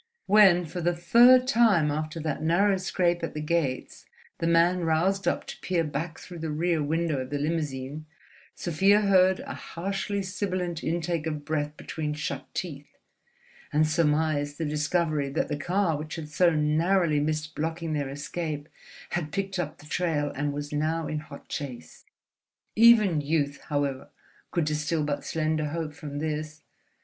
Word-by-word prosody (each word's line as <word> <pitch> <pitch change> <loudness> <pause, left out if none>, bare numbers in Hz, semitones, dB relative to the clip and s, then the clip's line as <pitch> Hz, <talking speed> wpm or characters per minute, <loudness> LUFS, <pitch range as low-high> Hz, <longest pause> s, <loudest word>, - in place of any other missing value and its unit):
When 190 -4 +6
for 165 +3 -5
the 175 +1 +1
third 245 +9 +6
time 215 - +4
after 155 +2 -3
that 155 -2 -3
narrow 190 +5 +3
scrape 175 -2 0
at - - -4
the - - -2
gates 150 -4 -2 0.3
the 165 - 0
man 170 +2 +3
roused 175 +5 +1
up - - 0
to - - -9
peer 175 -3 0
back 155 +2 -4
through 175 0 -10
the 160 0 -3
rear 160 +1 0
window 160 0 0
of 130 0 -5
the 145 - -2
limousine, 150 -1 -3 0.5
Sofia 195 +5 +3
heard 190 -2 +4
a - - -6
harshly 195 +3 -3
sibilant 185 -3 -3
intake 165 -1 -1
of 150 -2 -4
breath 150 -1 -2
between 150 -2 -4
shut 150 -2 -5
teeth, 160 -5 -6 0.7
and 155 +1 +3
surmised 150 -2 +1
the 165 - -2
discovery 150 -1 0
that 140 - -1
the 150 - -1
car 175 +2 0
which 150 +1 -5
had 160 -3 -7
so 175 +3 +4
narrowly 155 +1 +2
missed 155 +1 -2
blocking 165 +1 -3
their 145 -2 -2
escape 150 +1 -5 0.4
had 155 -4 -2
picked 195 0 -2
up 155 -3 -3
the - - -16
trail, 155 -3 -1
and 145 +1 -1
was 145 +1 -5
now 155 +2 0
in 155 0 -3
hot 150 - -12
chase. 125 - -7 0.7
Even 215 -8 +6
youth, 145 -1 -1
however, 140 -3 -1 0.4
could 170 -4 0
distill 150 +1 -1
but 145 -1 -2
slender 155 -1 -1
hope 155 0 -4
from 145 -1 -7
this. 155 0 -4
160 Hz, 160 wpm, -27 LUFS, 150-175 Hz, 0.7 s, When